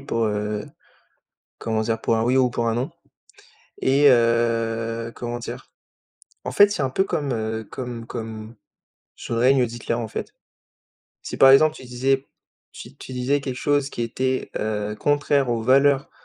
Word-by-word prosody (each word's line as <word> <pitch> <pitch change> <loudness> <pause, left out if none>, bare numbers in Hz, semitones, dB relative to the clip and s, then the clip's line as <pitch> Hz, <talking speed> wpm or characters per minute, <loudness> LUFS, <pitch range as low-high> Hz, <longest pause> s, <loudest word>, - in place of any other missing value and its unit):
pour, 115 -4 -1
heu, 105 0 -2 0.9
comment 110 -1 -1
dire? 115 0 -1
Pour 115 - +1
un 110 - +1
oui 125 +2 +2
ou 130 -1 +3
pour 120 -1 -1
un 115 - 0
non 125 +3 -2 0.9
et 140 +2 +5
heu, 115 -1 +1
comment 120 0 -5
dire? 120 - -8 0.7
En - - -4
fait, 205 0 +6
c'est - - -2
un 130 - 0
peu 190 +9 +1
comme, 145 -7 -2
heu, 110 -1 -3
comme 120 -1 -7
comme 110 -1 -7 0.6
sous - - -7
le - - -1
règne 130 0 +4
d'Hitler, 115 0 -4
en 115 -2 -3
fait, - - -6 0.9
si, - - -6
par 135 - +7
exemple, 155 +3 +6
tu 130 - -11
disais 135 +2 0 0.5
si 130 +4 -11
tu 130 - -10
disais 130 +3 0
quelque 130 -2 -4
chose 145 0 0
qui - - -7
était, 130 +3 -2
heu, 105 0 -3
contraire 145 -2 +1
aux 115 -1 -1
valeurs 135 +2 +3
120 Hz, 170 wpm, -23 LUFS, 115-135 Hz, 0.9 s, par